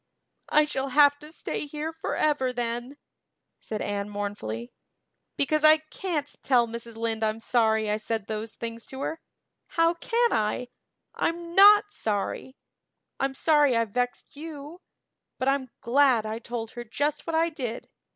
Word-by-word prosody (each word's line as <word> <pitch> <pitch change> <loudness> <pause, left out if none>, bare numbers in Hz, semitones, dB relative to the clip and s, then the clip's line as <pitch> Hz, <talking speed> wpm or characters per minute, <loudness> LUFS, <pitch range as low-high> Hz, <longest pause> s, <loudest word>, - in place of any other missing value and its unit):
"I 300 0 +5
shall 275 -2 -2
have 285 +1 +5
to 300 +1 -11
stay 305 - -4
here 305 +2 -4
forever 295 -4 0
then," 240 +2 -3 0.6
said 215 -1 -4
Anne 205 0 -3
mournfully, 200 - -5 0.7
"because 305 +2 +1
I 310 0 +8
can't 310 0 -4 0.2
tell 245 -3 +3
Mrs. 230 0 -7
Lynde 225 -1 -2
I'm 215 0 0
sorry 220 -2 +2
I 210 0 +1
said 220 -1 -3
those 220 +1 -5
things 230 0 -6
to 265 0 -8
her. 320 +3 -3 0.5
How 330 0 +2
can 470 +7 +1
I? 220 +3 0 0.4
I'm 335 0 -2
not 410 +2 +7
sorry. 215 - -3 0.6
I'm 270 0 -1
sorry 295 -5 +4
I've 230 -2 0
vexed 245 +4 -2
you; 305 +2 -9 0.6
but 260 - -2
I'm 270 -1 +1
glad 250 -2 +3
I 215 +1 -3
told 235 -2 -5
her 240 - -7
just 290 +8 -2
what 330 - -1
I 330 +1 +3
did. 250 -7 -5
260 Hz, 150 wpm, -27 LUFS, 225-305 Hz, 0.7 s, I